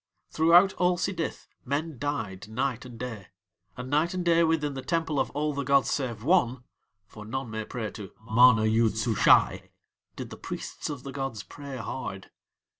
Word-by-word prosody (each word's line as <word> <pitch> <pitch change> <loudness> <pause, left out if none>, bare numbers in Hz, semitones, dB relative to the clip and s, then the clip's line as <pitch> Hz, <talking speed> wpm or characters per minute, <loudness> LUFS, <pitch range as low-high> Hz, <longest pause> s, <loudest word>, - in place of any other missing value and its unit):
Throughout 175 +4 +5
all 180 0 +3
Sidith 175 -2 -3 0.2
men 145 +1 -3
died 110 -9 -3
night 125 +2 -2
and 120 -2 -10
day, 115 -5 -6 0.5
and 125 0 -6
night 155 +6 +1
and 180 -1 -2
day 170 0 +4
within 160 -3 +1
the 135 - -5
Temple 160 -2 -1
of - - 0
All 150 +1 0
the 140 - -2
gods 140 0 +3
save 120 -6 -2
One 130 -6 +2 0.4
(for 105 +2 -12
none 120 +2 -5
may 110 0 -4
pray 110 -3 -5
to 100 -4 -9
MANA 110 0 +5
YOOD 110 0 +3
SUSHAI) 110 -1 +3 0.5
did - - -7
the - - -8
priests - - -6
of 140 -4 -6
the 140 - -6
gods 135 -6 -4
pray 140 +1 -9
hard. 110 - -6
135 Hz, 175 wpm, -27 LUFS, 115-150 Hz, 0.5 s, Throughout